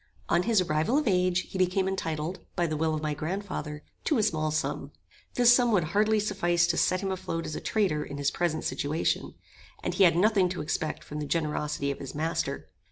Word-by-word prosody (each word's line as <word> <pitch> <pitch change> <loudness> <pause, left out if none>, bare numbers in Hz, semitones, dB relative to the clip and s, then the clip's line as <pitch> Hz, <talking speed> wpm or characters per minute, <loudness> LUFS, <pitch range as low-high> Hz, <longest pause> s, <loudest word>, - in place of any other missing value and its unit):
On - - +4
his 215 0 +3
arrival 165 - +1
of 300 - 0
age 180 -2 +2
he 190 - -4
became 185 +1 +2
entitled, 165 -2 -3 0.2
by 175 - +1
the 155 -2 -1
will 160 +1 0
of 155 - -4
my 150 -1 0
grand 175 +8 -3
father, 150 -6 -5 0.2
to 305 - +2
a 220 - +2
small 155 -6 +1
sum. 150 -2 -2 0.4
This 245 -1 +7
sum 245 -1 +4
would 185 -5 +3
hardly 215 +1 +3
suffice 175 -4 +1
to 170 -1 0
set 185 - +2
him 195 -1 -2
afloat 185 -3 -3
as 155 - -4
a - - -5
trader 185 -9 0
in 140 - -7
his 145 0 0
present 170 -3 -1
situation, 150 +3 -1 0.5
and - - -1
he 200 - +4
had 170 -3 +6
nothing 195 0 +3
to 180 - -4
expect 155 +1 -2
from 150 - -6
the 150 - -4
generosity 150 -2 -1
of 140 - -6
his 135 - -7
master. 160 +3 -2
170 Hz, 220 wpm, -28 LUFS, 155-195 Hz, 0.5 s, This